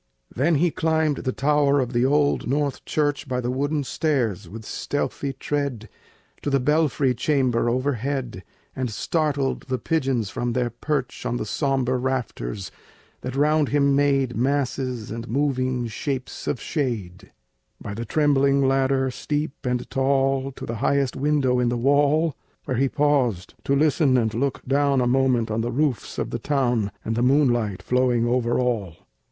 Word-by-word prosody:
Then 155 Hz, +7 st, +2 dB
he 170 Hz, +3 st, +2 dB
climbed 160 Hz, -2 st, +1 dB
to -, -, -5 dB
the 130 Hz, -, -1 dB
tower 145 Hz, +1 st, +2 dB
of 130 Hz, -1 st, -1 dB
the 120 Hz, +1 st, +2 dB, 0.8 s
church, 145 Hz, -3 st, -1 dB
Up 125 Hz, 0 st, -1 dB
the 120 Hz, -, -1 dB
wooden 145 Hz, +3 st, -1 dB
stairs, 125 Hz, -, -1 dB
with 110 Hz, +3 st, -9 dB
stealthy 140 Hz, +1 st, -3 dB
tread, 135 Hz, -4 st, -3 dB, 0.5 s
To -, -, -2 dB
the 140 Hz, -1 st, +2 dB
belfry 145 Hz, -1 st, +2 dB
chamber 125 Hz, -3 st, +1 dB
overhead, 130 Hz, -4 st, -2 dB, 0.3 s
And 130 Hz, -2 st, -2 dB
startled 145 Hz, +3 st, -1 dB
the 130 Hz, -1 st, -1 dB
pigeons 130 Hz, -9 st, -1 dB
from 120 Hz, -1 st, -2 dB
their 125 Hz, -1 st, 0 dB
perch 135 Hz, +2 st, -3 dB
On 120 Hz, -, -1 dB
the -, -, -3 dB
sombre 130 Hz, +1 st, 0 dB
rafters, 115 Hz, -, -3 dB, 0.5 s
that 130 Hz, +1 st, -5 dB
round 150 Hz, +1 st, +2 dB
him 140 Hz, -1 st, +3 dB
made 135 Hz, -3 st, +2 dB
Masses 130 Hz, -2 st, -1 dB
and 115 Hz, +1 st, -5 dB
moving 130 Hz, -1 st, 0 dB
shapes 130 Hz, +3 st, -4 dB
of -, -, -1 dB
shade, 105 Hz, -, -3 dB, 0.5 s
Up 105 Hz, -, -4 dB
the 115 Hz, -, -4 dB
trembling 140 Hz, 0 st, +3 dB
ladder, 135 Hz, 0 st, +2 dB
steep 150 Hz, +4 st, -2 dB, 0.2 s
and 125 Hz, -1 st, -1 dB
tall, 135 Hz, 0 st, +1 dB
To -, -, -8 dB
the 115 Hz, -, -4 dB
highest 140 Hz, -2 st, +1 dB
window 135 Hz, -3 st, +1 dB
in 125 Hz, -1 st, +2 dB
the 120 Hz, -, -1 dB
wall, 145 Hz, +4 st, +3 dB, 0.3 s
Where 125 Hz, -, -2 dB
he 135 Hz, +1 st, +2 dB
paused 130 Hz, -11 st, +1 dB
to 140 Hz, -, +2 dB
listen 145 Hz, -2 st, +3 dB
and 110 Hz, -2 st, +1 dB
look 135 Hz, +4 st, -2 dB
down 140 Hz, 0 st, +2 dB
A 125 Hz, -, +2 dB
moment 125 Hz, -3 st, +2 dB
on 110 Hz, +1 st, 0 dB
the 120 Hz, +1 st, -2 dB
roofs 135 Hz, -1 st, -1 dB
of -, -, -2 dB
the 120 Hz, -, -3 dB
town, 120 Hz, -6 st, 0 dB
And 115 Hz, -, -1 dB
the 120 Hz, -, 0 dB
moonlight 120 Hz, -7 st, +2 dB
flowing 125 Hz, -2 st, +2 dB
over 120 Hz, 0 st, +1 dB
all. 110 Hz, -9 st, -1 dB
130 Hz, 160 wpm, -24 LUFS, 120-145 Hz, 0.8 s, him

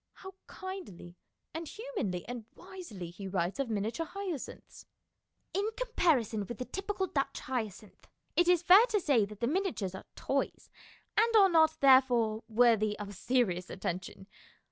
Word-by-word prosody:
How 380 Hz, 0 st, -11 dB
kindly 370 Hz, -, -8 dB, 0.4 s
and 325 Hz, 0 st, -5 dB
humanly 405 Hz, -, -4 dB
and 240 Hz, -2 st, -6 dB
wisely 350 Hz, -, -9 dB
he 195 Hz, +2 st, -8 dB
writes 185 Hz, +4 st, -2 dB
of 275 Hz, -3 st, -1 dB
miniature 220 Hz, +10 st, -2 dB
hyacinths: 375 Hz, -8 st, -7 dB, 0.3 s
" -, -, -50 dB
In 405 Hz, +3 st, 0 dB
comparison 290 Hz, -, +1 dB
with 240 Hz, -, -6 dB
the 250 Hz, -, -4 dB
typical 390 Hz, +3 st, -3 dB
Dutch 280 Hz, -6 st, -2 dB
hyacinth 220 Hz, -5 st, -5 dB, 0.3 s
it 350 Hz, -, +3 dB
is 355 Hz, -1 st, +4 dB
fair 390 Hz, +7 st, +8 dB
to 435 Hz, -4 st, +1 dB
say 275 Hz, -, +3 dB
that 210 Hz, +1 st, -12 dB
the -, -, +2 dB
miniatures 315 Hz, -, -1 dB
are 190 Hz, -, -9 dB
toys, -, -, -2 dB, 0.4 s
and 460 Hz, +2 st, +3 dB
are 395 Hz, -3 st, +7 dB
not, 320 Hz, -2 st, +4 dB
therefore, 245 Hz, -5 st, +4 dB
worthy 220 Hz, -2 st, +3 dB
of 205 Hz, -1 st, -7 dB
serious 190 Hz, -5 st, 0 dB
attention. 185 Hz, +1 st, -5 dB
255 Hz, 150 wpm, -31 LUFS, -, 0.4 s, fair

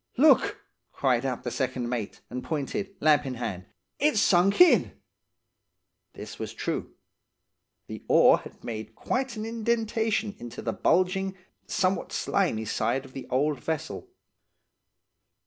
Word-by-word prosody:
"'Look!' 400 Hz, -, +4 dB, 0.3 s
cried 130 Hz, -1 st, +1 dB
out 125 Hz, -2 st, -3 dB
the 120 Hz, -, -3 dB
second 130 Hz, -2 st, -2 dB
mate, 120 Hz, -4 st, -4 dB
and 125 Hz, +1 st, -4 dB
pointed, 190 Hz, +7 st, -3 dB
lamp 150 Hz, -1 st, +4 dB
in 130 Hz, -2 st, -4 dB
hand. 100 Hz, -7 st, -4 dB, 0.3 s
'It's 295 Hz, -6 st, +3 dB
sunk 195 Hz, -1 st, +4 dB
in!' 360 Hz, -1 st, +6 dB, 1.2 s
"This -, -, -9 dB
was -, -, -5 dB
true. -, -, -4 dB, 0.9 s
The -, -, -8 dB
oar -, -, +6 dB
had -, -, -14 dB
made -, -, -6 dB
quite 260 Hz, -2 st, -2 dB
an 215 Hz, 0 st, -4 dB
indentation 225 Hz, -1 st, 0 dB
into 120 Hz, -1 st, -8 dB
the -, -, -1 dB
bulging, 190 Hz, +1 st, +1 dB, 0.3 s
somewhat 185 Hz, +1 st, 0 dB
slimy 150 Hz, -, 0 dB
side 120 Hz, +6 st, -1 dB
of 130 Hz, -, -15 dB
the 135 Hz, -, -7 dB
old 140 Hz, +2 st, +1 dB
vessel. 160 Hz, -, -4 dB
170 Hz, 130 wpm, -27 LUFS, -, 1.2 s, in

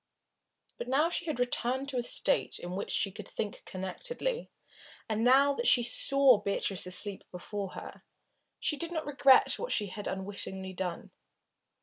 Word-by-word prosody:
But -, -, -5 dB
now 270 Hz, +4 st, +2 dB
that 335 Hz, +1 st, -1 dB
she -, -, -2 dB
had 300 Hz, -5 st, -3 dB
returned 250 Hz, +2 st, -1 dB
to 265 Hz, -, -3 dB
a -, -, +1 dB
state 240 Hz, -, +1 dB
in 175 Hz, -, -7 dB
which 195 Hz, +2 st, -4 dB
she 195 Hz, -, 0 dB
could 195 Hz, +1 st, -9 dB
think 205 Hz, -2 st, -5 dB
connectedly, 480 Hz, -, -4 dB, 0.6 s
and 220 Hz, 0 st, -1 dB
now 275 Hz, +3 st, +5 dB
that 475 Hz, -, -2 dB
she 240 Hz, -, +6 dB
saw 265 Hz, 0 st, +4 dB
Beatrice 200 Hz, -2 st, -1 dB
asleep 190 Hz, +2 st, +2 dB
before 195 Hz, +2 st, -6 dB
her, -, -, -10 dB, 0.6 s
she 300 Hz, -, -1 dB
did 335 Hz, +2 st, -3 dB
not 320 Hz, -2 st, -3 dB
regret 275 Hz, -2 st, +4 dB
what -, -, -4 dB
she 205 Hz, -3 st, 0 dB
had 205 Hz, +2 st, -6 dB
unwittingly 190 Hz, -1 st, -3 dB
done. 180 Hz, -2 st, -5 dB
235 Hz, 165 wpm, -30 LUFS, 190-275 Hz, 0.6 s, she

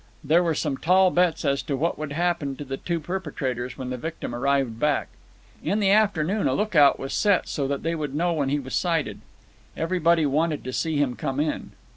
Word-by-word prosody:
There 160 Hz, +4 st, +4 dB
were 165 Hz, -3 st, 0 dB
some 145 Hz, -3 st, -1 dB
tall 185 Hz, +2 st, +4 dB
bets 175 Hz, -3 st, +1 dB
as 140 Hz, -1 st, +1 dB
to 140 Hz, -, -3 dB
what 165 Hz, +4 st, -1 dB
would 155 Hz, -2 st, -4 dB
happen 165 Hz, -3 st, -1 dB
to 145 Hz, -, -7 dB
the 135 Hz, 0 st, -4 dB
two 170 Hz, +3 st, -2 dB
perpetrators 140 Hz, -8 st, -4 dB
when 130 Hz, -2 st, -5 dB
the 125 Hz, -, -3 dB
victim 160 Hz, -2 st, -5 dB
arrived 130 Hz, -2 st, 0 dB
back. 150 Hz, +1 st, +1 dB, 0.5 s
In 205 Hz, -, 0 dB
the 195 Hz, -2 st, +3 dB
afternoon 200 Hz, -2 st, +2 dB
a -, -, +1 dB
lookout 165 Hz, -10 st, +4 dB
was 135 Hz, -, -5 dB
set, 205 Hz, -3 st, +2 dB
so 140 Hz, -2 st, -2 dB
that 140 Hz, 0 st, -3 dB
they 165 Hz, +1 st, 0 dB
would 150 Hz, -4 st, -4 dB
know 170 Hz, +2 st, +1 dB
when 145 Hz, -4 st, 0 dB
he 145 Hz, -, +1 dB
was 130 Hz, -2 st, -7 dB
sighted. 165 Hz, -5 st, 0 dB, 0.6 s
Everybody 170 Hz, -1 st, +2 dB
wanted 150 Hz, +2 st, 0 dB
to 130 Hz, -, -5 dB
see 160 Hz, +1 st, -1 dB
him 140 Hz, -4 st, +1 dB
come 135 Hz, +3 st, -3 dB
in. 150 Hz, +1 st, -2 dB
155 Hz, 210 wpm, -25 LUFS, 140-170 Hz, 0.6 s, There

